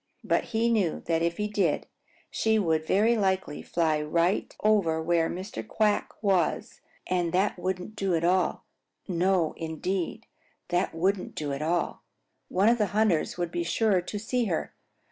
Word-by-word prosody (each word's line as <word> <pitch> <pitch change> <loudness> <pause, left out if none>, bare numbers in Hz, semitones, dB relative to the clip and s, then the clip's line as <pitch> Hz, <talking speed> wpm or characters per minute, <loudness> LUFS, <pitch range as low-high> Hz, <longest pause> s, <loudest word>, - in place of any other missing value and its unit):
But - - +1
he 230 0 0
knew 195 -8 0
that 165 -1 +1
if 170 0 0
he 210 - -1
did, 200 -7 0 0.5
she 220 0 +2
would 160 -6 +1
very 220 +5 +3
likely 190 -7 0
fly 160 -3 0
right 170 +5 +1
over 200 -7 +3
where 165 0 +1
Mr. 190 +5 -6
Quack 215 -2 +1
was, 190 -5 0 0.2
and 175 -2 0
that 190 +1 +1
wouldn't 185 +3 -3
do 195 -4 0
at 165 - -1
all. 180 +1 +1 0.4
No, 180 -2 +1
indeed, 175 +6 -3 0.4
that 175 -1 0
wouldn't 185 +3 0
do 145 -2 -3
at 140 - -4
all. 170 +2 -1 0.5
One 195 +3 +2
of 235 +1 +4
the 210 - +2
hunters 205 -9 +2
would 175 -1 -2
be 175 - -2
sure 195 +2 +2
to 205 - -5
see 235 +3 -1
her. 175 -6 -2
185 Hz, 165 wpm, -27 LUFS, 165-210 Hz, 0.5 s, of